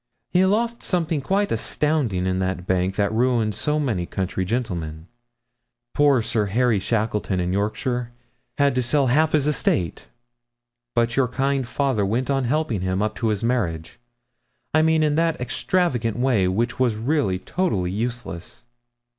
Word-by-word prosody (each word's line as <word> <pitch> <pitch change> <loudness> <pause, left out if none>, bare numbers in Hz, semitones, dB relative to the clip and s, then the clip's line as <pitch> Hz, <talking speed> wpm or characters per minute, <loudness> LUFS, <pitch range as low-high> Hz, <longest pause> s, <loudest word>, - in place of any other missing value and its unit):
He 180 +1 +4
lost 235 +4 0
something 165 -4 -1
quite 200 +7 0
astounding 140 -12 0
in 95 0 0
that 95 -1 -2
bank 95 0 0
that 100 0 0
ruined 115 -2 +2
so 150 +8 0
many 110 - -1
country 95 -1 -2
gentlemen 85 -8 -3 0.9
poor 145 -5 +4
Sir 110 -2 0
Harry 115 +1 +2
Shackleton, 105 -2 -1
in 90 0 -1
Yorkshire, 120 +4 -1 0.5
had 140 -1 +3
to 130 - +1
sell 135 +3 +2
half 155 +2 +3
his 150 -3 +3
estate. 115 - 0 0.9
But 120 0 +1
your 135 -2 +3
kind 135 +1 -1
father 130 -5 0
went 120 +7 0
on 135 -2 +1
helping 125 - 0
him, 95 0 -1
up 110 0 -1
to 115 - -1
his 105 -1 -1
marriage 95 -11 -1 0.7
I 155 - +5
mean 160 0 +3
in 150 -1 +2
that 165 -1 0
extravagant 125 - 0
way 120 -7 +2
which 115 +8 -1
was 125 -4 +2
really 110 -4 0
totally 95 - -1
useless.' 115 -4 -5
120 Hz, 155 wpm, -23 LUFS, 100-140 Hz, 0.9 s, I